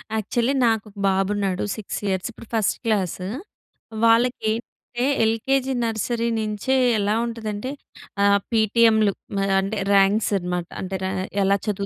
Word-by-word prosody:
Actually 235 +5 0
నాకు 225 -2 +1
ఒక 205 - -21
బాబు 195 0 +1
ఉన్నాడు 195 -2 -1
6 215 - -5
ఇయర్స్. 190 -2 -1
ఇప్పుడు 230 - -14
ఫస్ట్ 220 -3 +1
క్లాసూ. 190 -4 -1 0.8
వాళ్ళకి 230 0 +3
ఎంటే 240 +1 -5 0.2
ఎల్‌కేజీ, 265 +4 0
నర్సరీ 230 +1 -1
నించే 215 +4 -1 0.2
ఎలా 205 +1 +1
ఉంటదంటే 225 +1 -4 0.5
ఆహ్, 200 0 +5
పీటీఎం‌లు 220 -1 +4 0.3
మరి 195 0 +1
అంటే 200 +3 -3 0.2
ర్యాంక్స్ 200 +2 +3
అనమాట 180 -1 -3
అంటే 190 0 -3
ర - - 0 0.4
ఎలా 195 +1 +3
చదు‌ 200 -1 -1
215 Hz, 135 wpm, -23 LUFS, 195-230 Hz, 0.8 s, ఆహ్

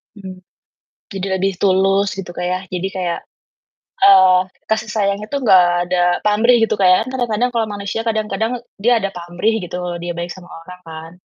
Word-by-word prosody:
Mmm, 190 -2 -10 0.8
tidak 190 0 -2
di - - +3
tulus 195 +1 +2
gitu, 180 -2 -6
Kak, 180 - -3
ya. 185 - -1
Jadi 180 +1 -3
kayak, 175 -2 -2 0.9
eee, 185 -2 +7 0.3
kasih 220 0 -1
sayang 200 -2 0
itu 250 +7 -6
nggak 185 -5 +6 0.2
ada 180 0 -1 0.3
pamrih 220 +4 +4
gitu, 225 - +1
Kak, 185 - +4
ya. 185 - +6
Kan - - -5
kadang-kadang 240 0 0
kalau 225 -1 +1
manusia 200 +2 -4
kadang-kadang 220 0 -1 0.3
dia 240 -1 +4
ada 195 - -2
pamrih 175 +5 -2
gitu, 180 0 -6 0.3
dia 175 - -3
baik 175 +1 -4
sama 180 -1 -14
orang 180 +2 -11
kan. 160 0 -9
195 Hz, 175 wpm, -18 LUFS, 180-215 Hz, 0.9 s, eee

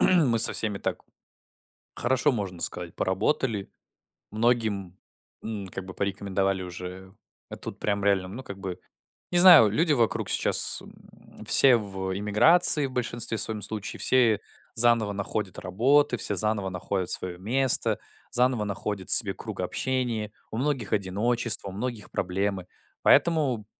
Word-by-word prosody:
мы 150 -11 +3
со - - +4
всеми 105 -3 -2
так - - -4 1.0
хорошо, 130 +3 +1
можно 95 -7 -5
сказать, 90 -1 -5
поработали. 100 +2 -2 0.6
Многим, 110 -5 -1 0.5
м, 105 -4 -6
как 95 +1 -8
бы 95 - -11
порекомендовали 95 -1 -2
уже 90 +1 -10 0.4
А - - -8
тут - - -9
прям 100 -1 -2
реально, 95 -2 +1
ну, 120 +7 -9
как 100 -5 -10
бы 95 -2 -7 0.5
Не 175 - +3
знаю, 175 - +8
люди 155 - +1
вокруг 115 -4 -1
сейчас, - - 0
м, - - -17
все 130 -3 +7
в 95 -3 -5
эмиграции, 140 - +6
в 130 - -10
большинстве 120 -2 -2
своём 105 0 0
случае. 105 0 -5
Все 115 -5 +3 0.3
заново 115 -3 +4
находят 100 0 -5
работы, 125 +9 +1
все 105 -3 -2
заново 105 -1 -1
находят 90 0 -4
своё 90 -1 -3
место, 125 +7 +1 0.3
заново 125 -2 +1
находят 100 -1 -5
себе - - +6
круг - - -8
общения. 120 -5 -3 0.2
У 110 - -5
многих 130 -4 -3
одиночество, 105 +2 0
у - - -8
многих 110 +2 -6
проблемы. 95 0 -3 0.4
Поэтому 140 -10 +2
105 Hz, 140 wpm, -25 LUFS, 95-125 Hz, 1.0 s, знаю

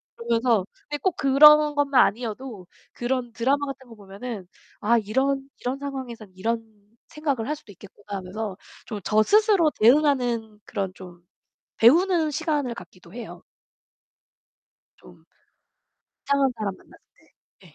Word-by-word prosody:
그러면서 235 -3 +1 0.2
근데 295 - -2
꼭 375 -3 0
그런 300 +2 +6
것만 280 -3 +4
아니어도 220 -3 -5 0.3
그런 245 -1 -2
드라마 275 +5 +1
같은 265 -1 -8
거 225 - -12
보면은 200 0 -8 0.3
'아, 235 +3 +3
이런 270 +6 0
이런 250 +2 -3
상황에선 255 -7 -7
이런 225 +5 -1 0.5
생각을 285 -8 -2
할 300 - -1
수도 255 -9 -15
있겠구나.' 200 +1 -10
하면서 190 +1 -6 0.3
좀 215 -3 -6
저 215 0 +3
스스로 410 - +4
대응하는 240 -5 +3
그런 195 -4 -3
좀 175 -2 -12 0.6
배우는 330 +6 +4
시간을 295 -5 -1
갖기도 180 -3 -14
해요. 240 -2 -9 1.5
좀 - - -18 1.0
이상한 280 -1 +2
사람 205 -3 -3
만났을 - - -20 0.6
때. 190 - -18
네. 155 - -20
240 Hz, 285 characters per minute, -24 LUFS, 210-280 Hz, 1.5 s, 그런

